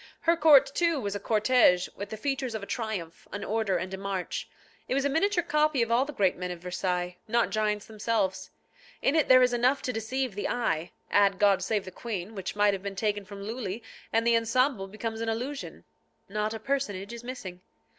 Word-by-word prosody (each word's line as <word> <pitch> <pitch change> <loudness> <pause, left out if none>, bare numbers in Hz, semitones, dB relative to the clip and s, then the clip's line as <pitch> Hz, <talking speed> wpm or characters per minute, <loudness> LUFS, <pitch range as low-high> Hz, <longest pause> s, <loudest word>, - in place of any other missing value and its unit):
Her 335 +1 +4
court, 295 -4 +7
too, 335 -2 +2
was 200 -5 -3
a 205 - -3
cortège, 215 -4 +4
with 200 - -6
the 220 - -6
features 265 -1 -2
of 215 - -4
a - - -4
triumph, 200 -8 -4
an 205 - -5
order 215 -4 0
and 185 +2 -4
a 190 - -4
march. 195 -2 -3 0.4
It - - 0
was 275 0 +1
a - - +3
miniature 350 +5 +2
copy 300 -5 +2
of 230 - -3
all 245 +3 +4
the 295 - -6
great 195 -9 +2
men 180 0 -4
of 180 - -5
Versailles, 180 0 -2
not 235 +1 +2
giants 210 -1 0
themselves. 210 -3 -1 0.5
In 275 - +3
it 315 - +3
there 255 0 +8
is 250 -1 +3
enough 250 +3 +2
to 250 - -2
deceive 240 +2 -2
the 205 - -2
eye; 175 -9 -1 0.2
add 200 -1 +4
God 200 -1 +4
save 210 -3 -1
the 185 - -8
Queen, 205 -1 -5
which 195 -2 -5
might 205 0 +4
have 195 - -3
been 200 0 -5
taken 205 0 -1
from 200 0 -9
Lulli, 225 -1 -4 0.3
and 225 0 +2
the 235 0 +5
ensemble 230 -2 +1
becomes 220 +2 -5
an 225 - -1
illusion. 255 +6 -4 0.4
Not 210 +2 -2
a - - -5
personage 220 -6 -2
is 235 0 -8
missing. 190 -8 -7
220 Hz, 215 wpm, -28 LUFS, 195-255 Hz, 0.5 s, there